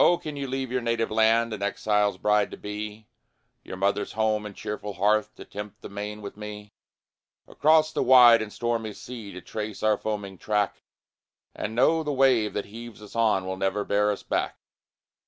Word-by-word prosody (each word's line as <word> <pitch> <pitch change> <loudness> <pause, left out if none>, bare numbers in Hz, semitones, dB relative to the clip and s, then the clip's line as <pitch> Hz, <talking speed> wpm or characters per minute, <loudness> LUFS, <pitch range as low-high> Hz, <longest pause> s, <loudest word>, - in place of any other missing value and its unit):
can 150 -2 -6
you 140 -1 -4
leave 130 -1 -3
your 130 0 0
native 115 -1 -1
land 115 +1 +3
An 105 - -6
exile's 105 0 +1
bride 105 +1 +2
to - - -9
be; 105 +1 -6 0.6
Your 95 - -8
mother's 100 +2 0
home, 110 -1 0
and 100 - -11
cheerful 105 -1 -5
hearth, 105 +2 +1
To - - -11
tempt 105 0 -8
the - - -7
main 105 +1 -6
with 100 - -7
me; 105 0 -9 0.7
Across 155 +1 +3
the - - 0
wide 120 -3 +8
and 110 -1 -5
stormy 115 -2 -2
sea 115 -4 -9
To 90 - -9
trace 105 +2 -6
our 110 -1 +3
foaming 100 -3 -4
track, 105 -1 0 0.7
And 110 - -4
know 160 +7 +4
the 150 -2 -2
wave 130 -5 +3
that 105 - -2
heaves 115 +2 -10
us 105 +1 -13
on 110 -5 +2
Will 95 0 -4
never 95 +2 -1
bear 105 +1 +2
us 105 - -2
back? - - -1
105 Hz, 185 wpm, -26 LUFS, 105-115 Hz, 0.7 s, wide